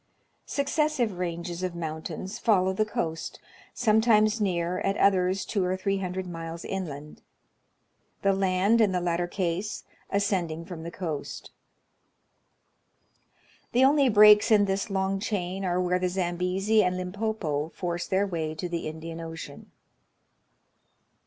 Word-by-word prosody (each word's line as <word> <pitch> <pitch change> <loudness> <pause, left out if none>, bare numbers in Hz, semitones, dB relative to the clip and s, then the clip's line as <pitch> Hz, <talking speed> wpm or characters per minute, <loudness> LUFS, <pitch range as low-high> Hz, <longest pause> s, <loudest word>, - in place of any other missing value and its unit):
Successive 280 - 0
ranges 170 0 -4
of 185 -2 -3
mount 160 -2 -5
ains 190 +2 -6
follow 190 -4 +3
the 215 +3 +1
coast, 165 -5 -3 0.3
sometimes 220 -1 +3
near, 180 -2 0
at 195 +1 -1
others 190 -1 +2
two 200 -4 -1
or 185 +1 0
three 195 +1 -1
hundred 185 0 -3
miles 165 -1 -7
inland; 150 -6 -6 1.0
the 195 0 +4
land, 195 +4 +2
in 205 -4 +3
the 180 - +1
latter 175 0 -1
case, 185 +3 -2 0.3
ascending 175 -5 -1
from 175 -2 -8
the 165 - -6
coast. 165 -4 -5 2.2
The 250 +2 +5
only 280 -1 +4
breaks 210 0 +7
in 210 -2 +5
this 195 +2 -1
long 195 0 0
chain 195 -2 -3
are 180 -1 0
where 180 0 +1
the 180 0 0
Zambezi 185 +4 +1
and 180 0 0
Limpopo 180 -6 -2
force 175 -1 -3
their 190 +2 +2
way 160 -5 -3
to 170 +3 -4
the 170 -2 -3
Indian 165 +1 -7
Ocean. 165 -3 -8
185 Hz, 135 wpm, -27 LUFS, 170-205 Hz, 2.2 s, breaks